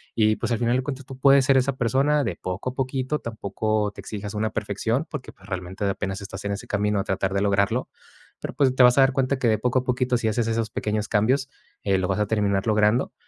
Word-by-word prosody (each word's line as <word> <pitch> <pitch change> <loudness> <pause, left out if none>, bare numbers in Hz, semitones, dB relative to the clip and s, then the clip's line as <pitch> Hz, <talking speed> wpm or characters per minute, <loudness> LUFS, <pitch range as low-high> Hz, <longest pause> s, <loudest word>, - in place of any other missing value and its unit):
Y 110 -1 +3
pues 120 - -3
al 115 - +2
final 120 0 +2
de 130 - -1
cuentas 135 -1 -5
tú 135 - -10
puedes 135 0 +6
ser 135 0 +4
esa 130 0 +1
persona 135 +5 +2
de 95 - -2
poco 95 +9 -4
a - - -17
poquito, 130 +2 -1
tampoco 110 -1 -2
te - - -9
exijas 105 -1 -6
una 110 +1 -1
perfección 115 - -2
porque, 150 -6 -7
pues, 95 - -19
realmente 95 +1 -4
apenas 95 0 -2
estás 100 - -8
en 100 - -1
ese 100 - -7
camino 105 0 0
a - - 0
tratar 95 0 -1
de 100 - +1
lograrlo, 100 +4 +1 0.5
pero - - -5
pues 135 -3 +2
te 130 - +6
vas 125 +1 +6
a - - +7
dar 135 0 +4
cuenta 135 0 0
que 125 - +1
de 110 -1 +3
poco 125 +3 +1
a - - -5
poquito, 125 0 +1
si 115 - -1
haces 110 +1 0
esos 115 -1 -1
pequeños 105 -1 -2
cambios, 130 +6 +1 0.3
eh, 100 -1 +2
lo 95 - -1
vas 95 - 0
a 105 - +1
terminar 100 -1 0
logrando 105 +3 +2
110 Hz, 250 wpm, -24 LUFS, 100-130 Hz, 0.5 s, a